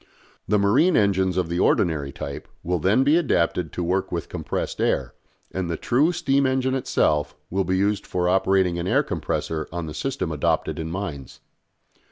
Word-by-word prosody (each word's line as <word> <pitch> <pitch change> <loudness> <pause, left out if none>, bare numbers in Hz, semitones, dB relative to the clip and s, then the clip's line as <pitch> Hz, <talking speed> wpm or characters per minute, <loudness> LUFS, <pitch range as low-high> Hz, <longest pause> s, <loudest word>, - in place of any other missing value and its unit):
The 105 - +3
marine 130 - +4
engines 95 -3 +2
of 90 -2 +1
the 85 +1 -2
ordinary 75 -9 +2
type 70 +1 -7 0.2
will 90 0 0
then 100 - +3
be 145 +4 +4
adapted 90 - +1
to 90 - -2
work 95 +3 -1
with 85 -1 -3
compressed - - -4
air, - - 0 0.4
and 95 -2 -3
the 85 - -2
true 145 +8 +2
steam 140 -5 +1
engine 130 0 0
itself 75 - +1 0.2
will 95 +1 0
be 95 0 +1
used 100 +1 0
for 90 -1 0
operating 95 -1 +2
an 85 - -3
air - - +3
compressor 80 -1 -3
on 85 0 -4
the 75 - -6
system 130 - -3
adopted 75 +1 0
in 80 0 -4
mines. 80 -7 -6
95 Hz, 180 wpm, -24 LUFS, 85-105 Hz, 0.4 s, marine